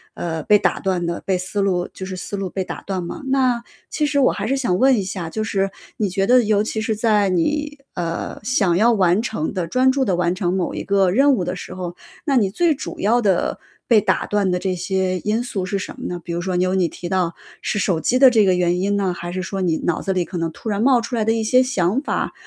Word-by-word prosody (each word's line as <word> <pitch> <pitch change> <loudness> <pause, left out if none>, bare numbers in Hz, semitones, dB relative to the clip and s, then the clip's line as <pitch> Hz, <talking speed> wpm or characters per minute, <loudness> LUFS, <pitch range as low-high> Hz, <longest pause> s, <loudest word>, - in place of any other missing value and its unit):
呃， 165 -2 -3
被 210 +5 +5
打 - - 0
断 185 -2 -1
的， 170 0 -3
被 190 -1 +1
思 185 +3 -4
路 180 -3 0
就 190 - -7
是 185 0 -5
思 185 +2 -5
路 195 -1 -3
被 190 +1 -3
打 - - -7
断 190 -3 -2
嘛。 230 - -6
那 260 -3 +2 0.3
其 300 - 0
实 290 -1 0
我 260 - +4
还 205 - -3
是 270 - +1
想 245 -10 0
问 260 0 +5
一 200 - 0
下， 185 -3 -5
就 215 +6 -3
是 195 -3 0 0.3
你 210 - 0
觉 195 +2 0
得 250 +3 +5
尤 210 -1 +2
其 220 0 -3
是 220 0 -1
在 210 -2 +2
你， 295 - -1 0.2
呃， 170 -1 -4
想 200 -7 +2
要 235 +4 +4
完 185 -1 +3
成 220 -9 -3
的 180 -3 -2
专 255 +8 +3
注 265 0 0
地 190 - +1
完 175 0 +1
成 185 -1 -1
某 185 -2 -1
一 - - -4
个 195 -2 +3
任 275 +7 +4
务 205 -8 0
的 180 +1 -2
时 185 - -8
候， 180 -1 -6 0.3
那 275 -3 +1
你 205 -4 +3
最 325 - +2
主 285 - -7
要 235 +4 +3
的， 195 -5 +1 0.3
被 230 -3 +6
打 - - 0
断 205 -2 0
的 180 - +1
这 185 +1 -1
些 185 0 -1
因 215 +6 -1
素 200 -6 -3
是 195 +2 -2
什 190 - -7
么 - - -4
呢？ 180 - -4
比 170 - -6
如 170 - -2
说 185 +1 -2
你 180 - +2
有 185 +1 +1
你 180 -3 +2
提 175 +2 -7
到， 180 -3 0 0.3
是 - - -2
手 185 -5 +1
机 240 +10 +1
的 265 0 +8
这 220 -4 +4
个 185 - +4
原 180 0 +1
因 200 +2 0
呢？ 195 -3 0
还 175 0 -6
是 185 - -2
说 195 +2 -4
你 170 -4 0
脑 175 - -1
子 195 - -1
里 180 -1 +1
可 180 +1 -6
能 165 0 -1
突 225 - -6
然 205 0 -1
冒 255 -1 +4
出 235 +1 -4
来 220 - +1
的 225 - +2
一 225 -1 -1
些 250 +4 +4
想 230 -2 +1
法 310 - -2
195 Hz, 290 characters per minute, -21 LUFS, 180-225 Hz, 0.3 s, 的